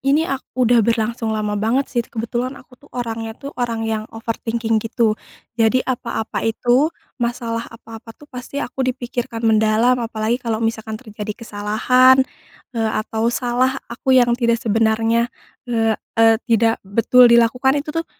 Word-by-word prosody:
Ini 280 +4 +2
ak 270 -4 -5
udah 245 -2 +4
berlangsung 230 0 0
lama 210 -1 -1
banget 250 +5 +1
sih, 240 - +1
kebetulan 240 +3 -4
aku 260 - -17
tuh 290 - -19
orangnya 225 -2 -4
tuh 280 0 -8
orang 230 -2 -1
yang 220 -1 -3
overthinking 225 0 -2
gitu, 225 0 +1 0.5
jadi 240 +3 +3
apa-apa 235 -3 -3
itu, 245 +6 +2 0.3
masalah 235 -1 -2
apa-apa 225 0 -12
tuh 295 - -15
pasti 250 +3 -8
aku 260 +2 -7
dipikirkan 245 -2 -3
mendalam 220 +3 +3
apalagi 225 +1 -2
kalau 230 -2 -2
misalkan 220 -1 -2
terjadi 210 -3 -7
kesalahan, 250 +5 +4 0.5
eee, 225 -2 -1
atau 225 +1 -1
salah 250 +2 0 0.2
aku 260 -1 +2
yang 240 -1 +5
tidak 235 -1 +2
sebenarnya, 225 +1 +1 0.4
eee 225 -2 +2 0.2
eee, 225 0 +6
tidak 225 0 +2
betul 230 +5 +4
dilakukan 245 +4 +4
itu 300 - -6
tuh 330 - -8
230 Hz, 150 wpm, -20 LUFS, 225-250 Hz, 0.5 s, eee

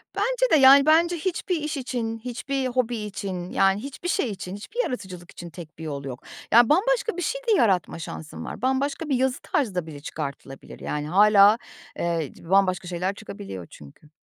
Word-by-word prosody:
Bence - - +1
de, - - +7
yani, 275 -1 +8
bence 335 +3 +4
hiçbir 360 +2 -2
iş 300 0 -3
için, 235 -4 -3
hiçbir 255 +3 -3
hobi 245 -1 -1
için, 195 -4 -5
yani, 195 +1 +3
hiçbir 280 +6 -6
şey 280 - 0
için, 185 -1 -6
hiçbir 440 - -3
yaratıcılık 185 - -6
için 175 - -9
tek 165 -1 -11
bir - - -7
yol 140 -3 -5
yok. 130 -2 -7 0.3
Yani, 235 0 +7
bambaşka 450 +4 +2
bir - - -2
şey - - -2
de - - +3
yaratma 190 - +1
şansın 160 -1 -7
var. - - -7
Bambaşka 275 +4 -1
bir 275 - +2
yazı 260 +1 0
tarzı 230 -10 -1
da 180 -3 -1
bile 150 -3 -8
çıkartılabilir, 140 -2 -7
yani, 150 0 -3
hâlâ, 205 +4 +6 0.4
eee, 165 -4 -1
c 165 - -15
bambaşka 185 -2 +2
şeyler 180 +2 -2
çıkabiliyor 200 - -8
çünkü. 75 - -15
215 Hz, 185 wpm, -25 LUFS, 175-275 Hz, 0.4 s, yani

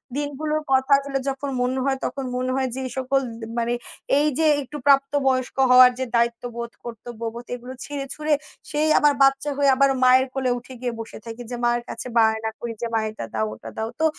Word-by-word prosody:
দিনগুলোর 295 +2 -2
কথাগুলো 275 +1 +3
যখন 275 +1 -4
মনে 255 +1 0
হয় 270 -1 +1
তখন 275 - -3
মনে 255 +1 -1
হয় 265 -1 0
যে 260 - -4
এই 255 - -5
সকল 265 +1 +1 0.4
মানে 235 0 0 0.5
এই 300 - +3
যে 320 - +2 0.2
একটু 290 +2 -7
প্রাপ্ত 275 -1 +5 0.2
বয়স্ক 255 -1 0 0.2
হওয়ার 250 0 +9
যে 260 - 0
দায়িত্ববোধ, 235 0 -1
কর্তব্যবোধ 235 0 -7
এগুলো 250 +1 -9
ছিঁড়ে 285 -1 -5
ছুঁড়ে 305 0 0 0.4
সেই 305 +1 +1
আবার 295 -1 +4
বাচ্চা 270 +2 +3
হয়ে 285 -1 +4
আবার 275 +1 +4
মায়ের 255 +1 +6
কোলে 260 -2 0
উঠে 245 +2 -10
গিয়ে 245 -2 -2
বসে 225 0 -7
থাকি। 230 +1 -7
যে - - -2
মায়ের 240 0 +2
কাছে 230 - -3
বায়না 220 0 +3
করি 235 -1 -4
যে, 235 - -1
"মা, 225 - +3
এটা 215 - -6
দাও। 110 -1 0
ওটা 110 +1 -10
দাও।" 220 - -2
তো 320 - +3
255 Hz, 200 wpm, -23 LUFS, 235-275 Hz, 0.5 s, হওয়ার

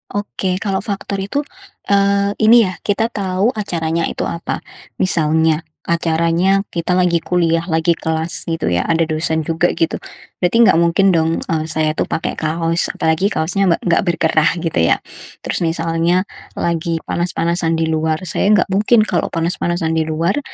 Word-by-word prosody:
Oke. 195 -2 -2
Kalau 195 -2 -1
faktor 200 -1 -4
itu, 240 +10 -2 0.5
eee, 200 0 +3
ini, 230 +1 +6
ya, 185 -3 -4
kita 220 +3 -1
tahu 195 +3 0
acaranya 170 -7 -2
itu - - -4
apa. 170 - -4 0.3
Misalnya, 160 -2 +1 0.2
acaranya 170 +3 +1
kita 170 +1 -2
lagi 175 -2 +2
kuliah, 165 -2 +1
lagi 160 0 +1
kelas, 160 +1 -3
gitu, 165 -1 -2
ya. 85 0 0
Ada 165 0 +2
dosen 160 0 0
juga, 165 +3 +1
gitu. 165 - -1 0.4
Berarti, 180 +5 +1
enggak 170 - +5
mungkin, 170 +3 +3
dong, 160 -2 +2 0.2
eee, 160 -1 0
saya 155 -1 0
itu - - -2
pakai 160 - -3
kaos, 165 +1 0
apalagi 160 +5 +1
kaosnya 190 +2 0
engga 170 - +2
enggak 170 -2 +2
berkerah, 160 -2 +2
gitu, 165 - -1
ya. 80 - +4 0.5
Terus, - - -2
misalnya 165 +2 0 0.3
lagi 165 -1 -2
panas-panasan 170 -1 -1
di 160 0 0
luar. 160 +2 -1
Saya 180 +3 -1
enggak 210 0 +4
mungkin 215 +3 +4
kalau - - -1
panas-panasan 170 0 -1
di 160 -1 0
luar, 165 - 0
170 Hz, 160 wpm, -17 LUFS, 160-190 Hz, 0.5 s, ini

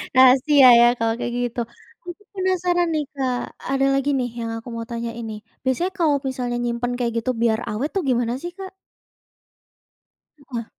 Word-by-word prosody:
Rahasia 260 +2 +7
ya 240 - +7
kalau 225 0 +1
kayak 240 - -3
gitu. 245 0 -2 0.4
Aku 350 +3 -9
penasaran 360 -2 +1
nih 305 -1 0
Kak 255 -3 -1 0.3
ada 270 0 +2
lagi 275 +1 +1
nih 250 - -1
yang 230 -1 -3
aku 230 - -11
mau 230 - -4
tanyain 235 0 -5
nih, 215 - -7 0.2
biasanya 265 +8 0
kalau 300 -4 +3
misalnya 250 -2 -2
nyimpen 240 +1 -2
kayak 230 -2 -1
gitu 255 - 0
biar 225 -1 +2
awet 250 +8 -2
tuh 385 - 0
gimana 240 -3 0
sih 345 - -5
Kak? 385 0 -8 1.7
Heeh. 245 -5 -6
255 Hz, 165 wpm, -22 LUFS, 235-295 Hz, 1.7 s, Rahasia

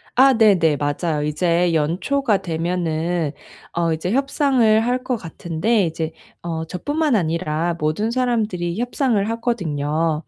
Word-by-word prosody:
아 265 +2 +6
네네. 180 -9 +4
맞아요. 150 +1 -1
이제 170 +3 +1
연초가 190 - +1
되면은 170 -1 -1 0.4
어 170 -1 +1
이제 160 +3 -3
협상을 265 -4 +3
할 250 +1 +1
것 255 -1 -1
같은데 175 +4 -1
이제 160 -1 -3 0.3
어 165 -1 -4
저뿐만 290 - -1
아니라 165 -2 0
모든 155 +9 0
사람들이 215 -8 -1
협상을 240 -4 0
하거든요. 165 - -1
175 Hz, 275 characters per minute, -21 LUFS, 160-230 Hz, 0.4 s, 아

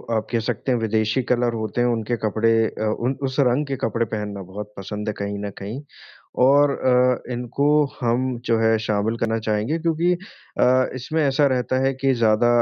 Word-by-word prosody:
आप 110 -1 -1
कह 115 - +1
सकते 120 +3 -2
हैं 125 - +1
विदेशी 110 +2 0
कलर 120 -1 0
होते 110 +1 -2
हैं 120 - +3
उनके 115 0 -1
कपड़े 110 +2 +2 0.2
अ, - - -6 0.2
उन 130 +3 -1
उस 130 - -5
रंग 135 +2 +2
के 135 - -2
कपड़े 115 +1 0
पहनना 105 -2 -5
बहुत 105 +3 -8
पसंद 105 +2 -6
है - - -2
कहीं 100 0 -3
न 100 - -3
कहीं 110 +8 -6 0.6
और 145 +2 +5
अ, 125 -1 +1
इनको 125 +3 -2 0.4
हम 125 +1 0
जो 115 - +2
है 110 0 +3
शामिल 110 +1 -1
करना 115 0 0
चाहेंगे 110 +7 -1
क्योंकि 170 +2 +1
अ, 130 -8 0
इसमें 155 +6 -2
ऐसा 140 +1 +3
रहता 130 -1 0
है 135 - +2
कि 135 +1 +1
ज़्यादा 115 -1 +3
120 Hz, 190 wpm, -22 LUFS, 110-130 Hz, 0.6 s, और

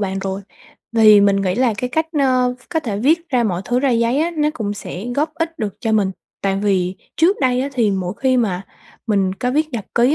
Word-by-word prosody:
bạn 195 -1 -2
rồi. 195 0 -3 0.5
Vì 215 -2 +7
mình 200 0 +4
nghĩ 190 -2 0
là 240 -1 +2
cái 250 +3 -2
cách, 320 +4 0
ơ, 255 -2 +3
v 255 - -22
có 325 -2 -1
thể 215 -9 -3
viết 330 +8 +2
ra 250 -4 +1
mọi 185 -3 -1
thứ 245 +3 0
ra 275 0 +2
giấy 235 +2 +2
á, 335 +2 +1
nó 300 0 +2
cũng 205 -5 -3
sẽ 195 -1 -7
góp 305 +2 0
ích 330 0 -3
được 210 -5 -3
cho 225 - -1
mình, 205 -3 +2 0.3
tại 195 -1 +1
vì 185 -2 +1 0.2
trước 355 +6 +3
đây 255 -2 +2
á, 275 - -1
thì 235 -5 +2
mỗi 185 -2 -2
khi 260 -1 +2
mà 195 -6 0 0.4
mình 195 -4 +1
có 250 +5 -2
viết 305 +4 +1
nhật 220 -5 -4
ký 245 +5 +4
235 Hz, 245 wpm, -19 LUFS, 200-270 Hz, 0.5 s, Vì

